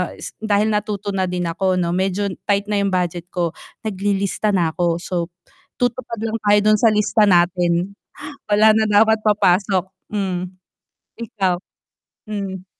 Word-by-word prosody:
s -, -, -8 dB
dahil 215 Hz, 0 st, +1 dB
natuto 210 Hz, -1 st, -2 dB
na 190 Hz, -1 st, -1 dB
din 180 Hz, 0 st, -2 dB
ako, 185 Hz, +2 st, 0 dB
'no, 170 Hz, -1 st, 0 dB
medyo 190 Hz, +2 st, 0 dB, 0.2 s
tight 200 Hz, 0 st, +1 dB
na 205 Hz, -, +1 dB
yung 200 Hz, -, +1 dB
budget 175 Hz, -1 st, -1 dB
ko. 170 Hz, -3 st, -1 dB, 0.3 s
Naglilista 200 Hz, 0 st, -1 dB
na 170 Hz, -3 st, +1 dB
'ko, 170 Hz, -1 st, +1 dB
so, 175 Hz, -1 st, -3 dB, 0.5 s
tutupad 245 Hz, -2 st, -2 dB
lang 225 Hz, 0 st, -1 dB
tayo 205 Hz, 0 st, +5 dB
dun 215 Hz, -, +3 dB
sa 230 Hz, -, +4 dB
lista 210 Hz, 0 st, +3 dB
natin, 175 Hz, +1 st, +2 dB, 0.5 s
wala 215 Hz, +1 st, +5 dB
na 220 Hz, 0 st, +2 dB
dapat 220 Hz, +1 st, +4 dB
papasok 190 Hz, -2 st, +2 dB, 0.3 s
hmm, 190 Hz, -4 st, -2 dB, 0.8 s
ikaw? 195 Hz, -5 st, -1 dB, 0.7 s
Hmm. 195 Hz, -3 st, -5 dB
200 Hz, 145 wpm, -20 LUFS, 180-210 Hz, 0.8 s, tayo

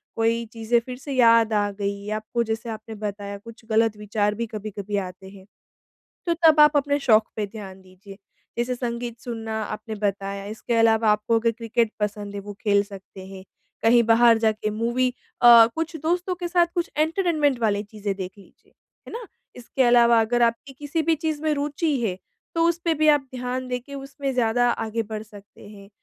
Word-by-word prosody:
कोई 230 Hz, +1 st, +1 dB
चीज़ें 230 Hz, +1 st, +1 dB
फिर 250 Hz, +2 st, -8 dB
से 275 Hz, +2 st, -8 dB
याद 230 Hz, -3 st, +5 dB
आ 205 Hz, -1 st, +1 dB
गईं 200 Hz, +1 st, -3 dB
आपको, 220 Hz, +2 st, -2 dB
जैसे 225 Hz, +1 st, -4 dB
आपने 220 Hz, 0 st, -7 dB
बताया 205 Hz, -1 st, -5 dB
कुछ 230 Hz, +3 st, -14 dB
ग़लत 220 Hz, 0 st, +3 dB
विचार 210 Hz, 0 st, -1 dB
भी 235 Hz, +2 st, -2 dB
कभी-कभी 210 Hz, -1 st, -5 dB
आते 185 Hz, +1 st, -11 dB
हैं। 190 Hz, -1 st, -15 dB, 0.8 s
तो 340 Hz, -, +2 dB
तब 310 Hz, -1 st, +6 dB
आप 300 Hz, 0 st, +6 dB
अपने 285 Hz, 0 st, +1 dB
शौक 220 Hz, -5 st, +4 dB
पे 210 Hz, -1 st, -1 dB
ध्यान 195 Hz, -2 st, -10 dB
दीजिए, 190 Hz, +2 st, -14 dB, 0.4 s
जैसे 240 Hz, +1 st, 0 dB
संगीत 235 Hz, -1 st, -4 dB
सुनना 225 Hz, -2 st, -4 dB
आपने 215 Hz, +1 st, -6 dB
बताया, 200 Hz, -1 st, -3 dB
इसके 220 Hz, +3 st, -4 dB
अलावा 225 Hz, -1 st, +4 dB
आपको 210 Hz, +2 st, +2 dB
अगर 230 Hz, 0 st, +2 dB
क्रिकेट 230 Hz, 0 st, -1 dB
पसंद 205 Hz, -1 st, -3 dB
है, 200 Hz, -, -4 dB
वो 205 Hz, +1 st, -8 dB
खेल 200 Hz, -2 st, +3 dB
सकते 195 Hz, -1 st, -12 dB
हैं, 190 Hz, -1 st, -11 dB, 0.4 s
कहीं 235 Hz, +1 st, +5 dB
बाहर 230 Hz, 0 st, +5 dB
जाके 215 Hz, -1 st, 0 dB
मूवी 240 Hz, +4 st, 0 dB, 0.3 s
अ, 235 Hz, -1 st, +9 dB
कुछ 325 Hz, +1 st, -3 dB
दोस्तों 350 Hz, +3 st, 0 dB
के 350 Hz, 0 st, -5 dB
साथ 345 Hz, 0 st, +3 dB
कुछ 345 Hz, -1 st, -1 dB
एंटरटेनमेंट 310 Hz, -4 st, +1 dB
वाली 205 Hz, -3 st, +1 dB
चीज़ें 205 Hz, -1 st, -5 dB
देख 190 Hz, -1 st, -6 dB
लीजिए, 195 Hz, -, -21 dB, 0.4 s
है -, -, -9 dB
ना। 465 Hz, 0 st, -6 dB, 0.3 s
इसके 245 Hz, +2 st, -2 dB
अलावा 235 Hz, -1 st, +5 dB
अगर 240 Hz, +2 st, +1 dB
आपकी 235 Hz, +4 st, 0 dB
किसी 295 Hz, +4 st, -3 dB
भी 325 Hz, +1 st, +2 dB
चीज़ 310 Hz, -1 st, -3 dB
में 310 Hz, -1 st, +1 dB
रुचि 290 Hz, +1 st, -1 dB
है, 190 Hz, -5 st, -2 dB, 0.4 s
तो 330 Hz, -, +1 dB
उसपे 340 Hz, 0 st, 0 dB
भी 310 Hz, 0 st, +1 dB
आप 295 Hz, -1 st, +5 dB
ध्यान 250 Hz, +1 st, -3 dB
दे 250 Hz, 0 st, -1 dB
के 280 Hz, +3 st, -12 dB
उसमें 275 Hz, 0 st, -5 dB
ज़्यादा 245 Hz, 0 st, +2 dB
आगे 225 Hz, 0 st, -2 dB
बढ़ 215 Hz, 0 st, -6 dB
सकते 205 Hz, -1 st, -15 dB
हैं। 200 Hz, -1 st, -13 dB
230 Hz, 190 wpm, -24 LUFS, 210-255 Hz, 0.8 s, अ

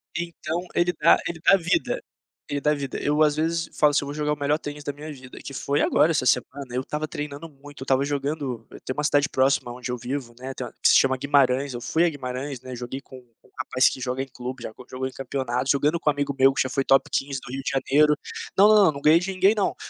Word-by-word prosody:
Então 170 Hz, -1 st, -3 dB, 0.2 s
ele 175 Hz, +1 st, +2 dB
dá 160 Hz, 0 st, +5 dB
ele 170 Hz, -1 st, -5 dB
dá -, -, +6 dB
a -, -, +7 dB
vida, 330 Hz, -, -1 dB, 0.5 s
ele 145 Hz, 0 st, -2 dB
dá 150 Hz, -, +2 dB
a -, -, +3 dB
vida, 140 Hz, -3 st, -4 dB
eu 150 Hz, +1 st, +1 dB
às 150 Hz, -1 st, +3 dB
vezes 165 Hz, +1 st, -1 dB
falo 150 Hz, -1 st, +5 dB
assim: 145 Hz, -, +1 dB
"Eu -, -, -6 dB
vou 145 Hz, -, -5 dB
jogar 150 Hz, 0 st, -1 dB
o 150 Hz, -, -7 dB
melhor 145 Hz, +1 st, +1 dB
tênis 145 Hz, -1 st, -7 dB
da 145 Hz, -, -3 dB
minha 150 Hz, +2 st, -8 dB
vida", 130 Hz, -3 st, -12 dB
que 140 Hz, -, -8 dB
foi 140 Hz, +2 st, -1 dB
agora 165 Hz, -, +3 dB
essa 150 Hz, -5 st, 0 dB
semana, 130 Hz, +2 st, 0 dB
eu 125 Hz, -, 0 dB
estava 150 Hz, +3 st, -4 dB
treinando 150 Hz, +2 st, -6 dB
muito, 145 Hz, -1 st, -14 dB
eu -, -, -3 dB
estava 135 Hz, 0 st, +2 dB
jogando 140 Hz, -4 st, -3 dB
eu -, -, -12 dB
tenho 130 Hz, -, -5 dB
uma 150 Hz, -, -1 dB
cidade 145 Hz, -1 st, +3 dB
próxima 130 Hz, -2 st, +1 dB
onde 125 Hz, 0 st, -6 dB
eu 125 Hz, -, -2 dB
vivo, 125 Hz, 0 st, -5 dB
né, 130 Hz, +1 st, -6 dB
tem 130 Hz, -, -5 dB
uma -, -, -10 dB
se -, -, +6 dB
chama 130 Hz, -1 st, +3 dB
Guimarães, 140 Hz, -1 st, +2 dB
eu 120 Hz, -, -6 dB
fui 160 Hz, +7 st, +1 dB
a -, -, +3 dB
Guimarães, 130 Hz, -2 st, -5 dB
né, 130 Hz, -1 st, -8 dB
joguei 125 Hz, +2 st, -6 dB
com 130 Hz, -2 st, -13 dB, 0.2 s
com -, -, -24 dB
um -, -, -29 dB
rapaz 130 Hz, 0 st, +3 dB
que -, -, -7 dB
joga 130 Hz, 0 st, -2 dB
em -, -, -10 dB
clube, 125 Hz, -1 st, -7 dB
já -, -, -5 dB, 0.2 s
jogou 130 Hz, +1 st, -3 dB
em -, -, -8 dB
campeonatos, 130 Hz, -1 st, -2 dB
jogando 150 Hz, +4 st, +1 dB
com 155 Hz, -, +1 dB
um -, -, +3 dB
amigo 145 Hz, -1 st, -2 dB
meu 135 Hz, 0 st, +5 dB
que -, -, 0 dB
já 130 Hz, -, -4 dB
foi 135 Hz, +1 st, 0 dB
top 135 Hz, 0 st, +3 dB
15 135 Hz, -1 st, -1 dB
do 120 Hz, -, -9 dB
Rio 135 Hz, +1 st, -4 dB
de -, -, -2 dB
Janeiro, 150 Hz, +3 st, +3 dB, 0.4 s
não 200 Hz, +2 st, +8 dB
não 215 Hz, -, +7 dB
não 160 Hz, -, +4 dB
não 140 Hz, -, -8 dB
ganhei 155 Hz, +3 st, +6 dB
de 185 Hz, +2 st, -3 dB
ninguém 190 Hz, +2 st, +4 dB
não. 205 Hz, -, 0 dB
140 Hz, 275 wpm, -24 LUFS, 130-150 Hz, 0.5 s, não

